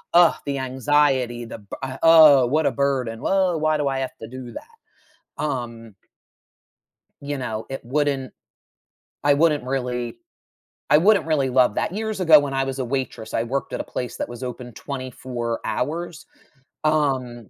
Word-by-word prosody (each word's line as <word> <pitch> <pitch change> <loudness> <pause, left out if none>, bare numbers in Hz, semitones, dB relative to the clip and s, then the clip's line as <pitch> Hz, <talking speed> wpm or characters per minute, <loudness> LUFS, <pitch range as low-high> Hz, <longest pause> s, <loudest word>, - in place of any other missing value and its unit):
ugh, 175 -1 +7
the 140 -1 -1
anxiety, 130 -2 +1
the 115 - -9
b 100 -2 -9 0.3
oh, 155 -6 +7
what 155 +5 +1
a - - +3
burden. 130 -5 -1
Well, 185 -4 +1
why 155 0 +1
do 145 -1 -1
I 135 -1 -1
have 130 -1 -5
to 110 - -8
do 125 0 -9
that? 460 0 -13 0.5
Um 115 -6 -5 1.3
You 145 0 -4
know, 110 -4 -4
it 135 - -5
wouldn't 135 0 -1 0.9
I 145 0 +5
wouldn't 150 -1 +2
really 125 -2 -3 0.7
I 150 - +7
wouldn't 200 +4 +4
really 145 -4 +1
love 125 -4 +3
that. - - -1
Years 220 -1 -3
ago 160 -4 +7
when 145 -1 -3
I 135 0 +1
was 135 0 -4
a 130 - -1
waitress, 130 -3 -4
I 115 - +1
worked 135 +3 -3
at - - -3
a - - -6
place 125 - -5
that - - -4
was 120 +1 -8
open 125 -1 -7
24 125 -3 -5
hours, 160 +4 -3 0.6
um, 130 -8 0
135 Hz, 165 wpm, -23 LUFS, 125-150 Hz, 1.3 s, ugh